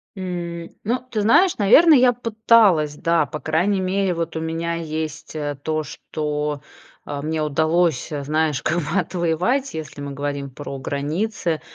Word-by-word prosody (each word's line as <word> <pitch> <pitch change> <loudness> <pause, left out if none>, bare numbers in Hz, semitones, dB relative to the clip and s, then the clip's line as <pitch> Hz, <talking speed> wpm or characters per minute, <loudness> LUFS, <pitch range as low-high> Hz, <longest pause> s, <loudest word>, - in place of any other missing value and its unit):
М. 175 -3 -5
Ну 240 +4 0
ты 215 - 0
знаешь, 335 - +4
наверное, 295 +10 +7
я 250 -1 +5
пыталась, 220 -9 +3
да. 165 0 +2
По 150 +2 -6
крайней 190 +6 +1
мере, 190 0 0
вот, 165 -1 -3
у - - -1
меня 165 +1 -2
есть, 155 -2 -5
э, 145 -1 -3
то, 155 +1 -1
что, 150 0 -4 0.4
э, 145 -1 -5
мне 155 +1 -2
удалось, 160 +1 +1
э, 145 -2 -3
знаешь 150 -1 0
как 170 - 0
бы 170 +4 0
отвоевать, 180 - 0
если 155 -2 -7
мы 140 0 -5
говорим 140 0 -4
про 140 +1 -7
границы. 160 - -2
160 Hz, 160 wpm, -22 LUFS, 150-190 Hz, 0.4 s, наверное